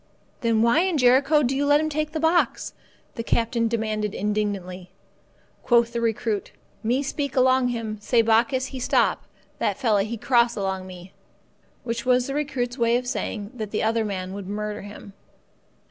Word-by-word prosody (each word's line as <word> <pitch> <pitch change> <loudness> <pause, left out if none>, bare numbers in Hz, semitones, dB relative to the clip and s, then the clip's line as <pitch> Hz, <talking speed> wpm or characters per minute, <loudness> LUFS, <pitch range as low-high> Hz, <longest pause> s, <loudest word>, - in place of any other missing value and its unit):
"Then 230 -2 +2
why 235 +7 +4
in 365 -2 +1
Jericho 275 +4 +4
do 260 +1 0
you 280 - 0
let 290 +1 +4
him 310 - 0
take 305 0 -2
the 315 - -3
box?" 325 +2 +1 0.4
the - - -4
captain 230 0 0
demanded 215 -2 -2
indignantly. 195 -3 -3 0.7
Quoth 235 -1 +3
the 235 - -2
recruit, 225 -2 -1 0.3
"Me 245 +5 0
speak 280 -1 -3
along 260 0 +4
him, 225 -3 -4
say 230 +2 +3
bokkis 250 +4 +2
he 265 - -7
stop, - - +1 0.3
that - - 0
fella 215 -6 +2
he 220 +4 -3
cross 235 0 +2
along 190 -2 -3
me"—which 190 +5 -10
was 250 0 +3
the 275 - -4
recruit's 270 -4 -2
way 235 0 +3
of 250 - -4
saying 215 -3 -4
that 220 -4 -5
the 210 - -2
other 225 +1 +1
man 190 -3 -4
would 200 -1 -7
murder 210 +1 -4
him. 205 0 -11
235 Hz, 170 wpm, -24 LUFS, 210-260 Hz, 0.7 s, why